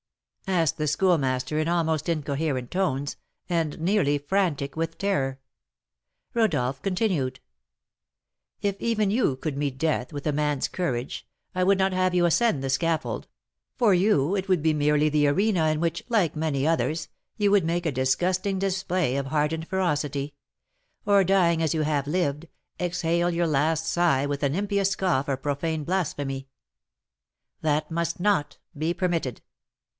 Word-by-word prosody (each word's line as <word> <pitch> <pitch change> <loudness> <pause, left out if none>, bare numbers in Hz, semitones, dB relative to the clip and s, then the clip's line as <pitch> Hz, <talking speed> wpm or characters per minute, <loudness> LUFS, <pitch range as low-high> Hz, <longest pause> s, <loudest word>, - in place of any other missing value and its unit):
asked 170 -5 +1
the 150 - -1
Schoolmaster, 150 -4 +1
in 155 - 0
almost 160 -2 0
incoherent 145 -4 -2
tones, 145 -7 -1 0.3
and 165 -4 -1
nearly 165 -4 +2
frantic 145 -3 -1
with 165 0 -3
terror. 135 -10 -1 0.9
Rodolph 145 - +1
continued: 180 - -1 1.2
"If 200 -1 0
even 215 -4 +1
you 220 - +2
could 150 +1 -3
meet 140 -2 -2
death 155 -4 -1
with 145 -2 -6
a 150 - +1
man's 150 -1 0
courage, 130 -8 -3 0.3
I 185 - +1
would 195 +1 +4
not 190 0 +1
have 185 0 +1
you 175 -1 +4
ascend 170 - +2
the 135 - -2
scaffold; 135 -4 -1 0.5
for 215 -5 +4
you 180 -3 +3
it 190 -1 -3
would 180 -5 +2
be 160 -1 +3
merely 150 0 +2
the 150 -1 +3
arena 180 +1 +2
in 155 0 +1
which, 170 0 -1
like 205 -10 +2
many 150 -2 0
others, 160 -1 0 0.3
you 205 -1 +2
would 200 -3 +4
make 170 +2 -1
a 160 - +1
disgusting 180 +9 0
display 185 -6 0
of 140 -1 -2
hardened 155 +3 -1
ferocity; 150 -6 -1 0.7
or, 200 -1 +5
dying 175 -3 +3
as 160 -1 +1
you 155 - +1
have 145 -2 0
lived, 150 -1 -1 0.3
exhale 175 -1 0
your 170 0 0
last 155 +2 +1
sigh 165 -6 +2
with 145 0 -3
an 140 0 +1
impious 200 0 +1
scoff 180 -8 0
or 135 - 0
profane 150 +3 -2
blasphemy. 145 -6 -2 1.1
That 155 0 0
must 170 +1 -2
not 180 -6 +1 0.2
be 155 +3 -1
permitted. 170 - -1
160 Hz, 150 wpm, -26 LUFS, 145-185 Hz, 1.2 s, or